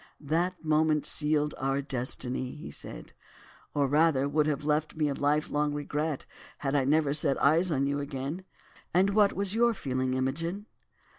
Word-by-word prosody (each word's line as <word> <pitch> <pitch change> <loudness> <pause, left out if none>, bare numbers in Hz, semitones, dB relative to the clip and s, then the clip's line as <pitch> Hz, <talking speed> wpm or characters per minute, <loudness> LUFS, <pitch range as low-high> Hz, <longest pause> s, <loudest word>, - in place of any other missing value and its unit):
"That 170 +4 -1
moment 155 -1 +2
sealed 150 -1 +2
our 135 +1 0
destiny," 130 -1 -3
he 150 - -8
said, - - -9 0.6
"or 145 -1 +3
rather, 145 -1 +3
would 150 +1 +1
have 145 -1 -1
left 150 +1 0
me 155 -2 +1
a - - 0
lifelong 145 +1 0
regret 150 0 -2 0.3
had 135 -1 -2
I 140 -2 +2
never 145 0 +2
set 140 -2 +1
eyes 165 +6 +4
on 140 -4 +1
you 140 +1 -1
again. 140 +5 -4 0.5
And 190 +2 +4
what 205 -1 +4
was 200 0 -1
your 235 +1 +3
feeling, 130 -4 -1
Imogen?" 165 +10 -2
150 Hz, 160 wpm, -29 LUFS, 140-160 Hz, 0.6 s, eyes